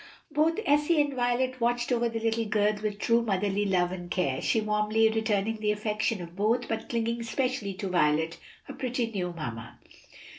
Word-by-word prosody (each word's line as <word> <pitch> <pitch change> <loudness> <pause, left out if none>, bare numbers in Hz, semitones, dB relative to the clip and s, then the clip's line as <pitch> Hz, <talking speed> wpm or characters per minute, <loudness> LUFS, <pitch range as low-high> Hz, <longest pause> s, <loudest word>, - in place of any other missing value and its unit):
Both 315 +5 +2
Elsie 295 +3 +3
and 290 -1 +2
Violet 255 0 0
watched 240 +1 +1
over 235 -1 +2
the 225 0 -3
little 225 0 0
girl 210 0 +2
with 210 -1 -2
true 230 +2 +2
motherly 205 -1 0
love 180 -2 +2
and 175 -1 -6
care; 140 -9 0
she 225 - +2
warmly 215 +1 +2
returning 220 -1 0
the 210 -1 0
affection 210 -1 -1
of 170 0 -11
both, 225 +5 +1
but 225 - -4
clinging 230 0 -1
especially 230 -3 -2
to 200 0 -4
Violet, 160 -2 +1 0.2
her - - -9
"pretty 245 -2 -2
new 180 -4 -2
mamma." 120 -9 -7
220 Hz, 180 wpm, -28 LUFS, 195-240 Hz, 0.2 s, Elsie